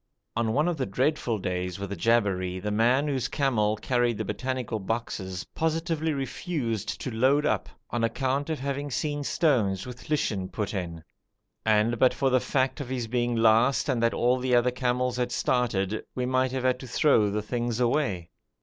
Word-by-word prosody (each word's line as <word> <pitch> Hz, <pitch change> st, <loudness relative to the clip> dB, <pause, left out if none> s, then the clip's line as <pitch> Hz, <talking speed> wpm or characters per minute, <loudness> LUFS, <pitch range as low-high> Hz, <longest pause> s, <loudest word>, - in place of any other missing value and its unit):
On 115 Hz, -1 st, +1 dB
one 150 Hz, +6 st, +2 dB
of 175 Hz, -2 st, 0 dB
the 130 Hz, -, -1 dB
dreadful 125 Hz, +2 st, 0 dB
days 90 Hz, -2 st, -3 dB
with 100 Hz, 0 st, -6 dB
the -, -, -2 dB
Jabberi, 95 Hz, -3 st, +1 dB
the 105 Hz, +2 st, -3 dB
man 120 Hz, +7 st, +3 dB
whose 130 Hz, -3 st, 0 dB
camel 110 Hz, -7 st, +1 dB
carried 120 Hz, 0 st, 0 dB
the 110 Hz, -, -3 dB
botanical 125 Hz, +2 st, -3 dB
boxes 95 Hz, -3 st, -3 dB
positively 160 Hz, 0 st, 0 dB
refused 135 Hz, -, -3 dB
to 130 Hz, -, -3 dB
load 135 Hz, +6 st, +3 dB
up, -, -, 0 dB, 0.2 s
on 120 Hz, -1 st, -1 dB
account 135 Hz, +5 st, 0 dB
of 160 Hz, -, -1 dB
having 140 Hz, +1 st, -3 dB
seen 145 Hz, +2 st, -2 dB
stones 115 Hz, -, +1 dB
with 125 Hz, +2 st, -10 dB
lichen 105 Hz, -11 st, 0 dB
put 105 Hz, -2 st, -3 dB
in; 85 Hz, -4 st, -4 dB, 0.6 s
and 110 Hz, +2 st, +2 dB
but 130 Hz, -, +4 dB
for 135 Hz, -1 st, +1 dB
the 130 Hz, -, +4 dB
fact 135 Hz, +3 st, 0 dB
of 130 Hz, -, -6 dB
his 125 Hz, -2 st, -2 dB
being 120 Hz, +1 st, 0 dB
last 115 Hz, +4 st, +4 dB
and 130 Hz, -5 st, +1 dB
that 115 Hz, 0 st, +2 dB
all 125 Hz, +1 st, +2 dB
the 125 Hz, -1 st, +2 dB
other 120 Hz, +1 st, +3 dB
camels 125 Hz, 0 st, 0 dB
had 125 Hz, -1 st, -1 dB
started, 110 Hz, -5 st, 0 dB
we 125 Hz, -, -1 dB
might 130 Hz, 0 st, +1 dB
have 130 Hz, -1 st, -2 dB
had 130 Hz, -1 st, +2 dB
to 130 Hz, -, -8 dB
throw 120 Hz, -4 st, +3 dB
the 105 Hz, +1 st, -2 dB
things 120 Hz, +1 st, -2 dB
away. 115 Hz, -, 0 dB
120 Hz, 185 wpm, -27 LUFS, 110-135 Hz, 0.6 s, but